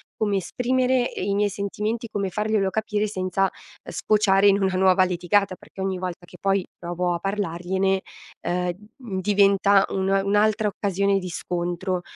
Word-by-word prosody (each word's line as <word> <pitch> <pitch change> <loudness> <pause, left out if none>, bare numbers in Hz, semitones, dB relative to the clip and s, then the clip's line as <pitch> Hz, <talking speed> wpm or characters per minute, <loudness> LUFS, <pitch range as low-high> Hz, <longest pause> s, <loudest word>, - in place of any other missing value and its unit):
come 205 -2 0
esprimere, 250 +5 0
ehm, - - -5
i 200 - 0
miei 205 0 +2
sentimenti, 210 +3 -3
come 200 -3 -2
farglielo 210 0 0
capire 215 +1 -1
senza, 185 -1 -1
uhm, - - -9
sfociare 205 -2 +3
in 200 0 +4
una 190 -1 +1
nuova 185 0 +4
litigata, 185 +2 +1
perché 190 - -11
ogni 190 -1 -1
volta 180 -1 -5
che 180 - -15
poi 195 -1 +1
provo 175 +1 -2
a 170 - -2
parlargliene, 190 0 -1 0.5
uhm, 180 0 0 0.3
mhmm, 225 -8 -5
diventa 200 0 +4
una 195 0 +1
un'altra 210 +1 +2
occasione 200 0 0
di 185 -1 -6
scontro. 175 +1 -2
195 Hz, 160 wpm, -24 LUFS, 185-205 Hz, 0.5 s, in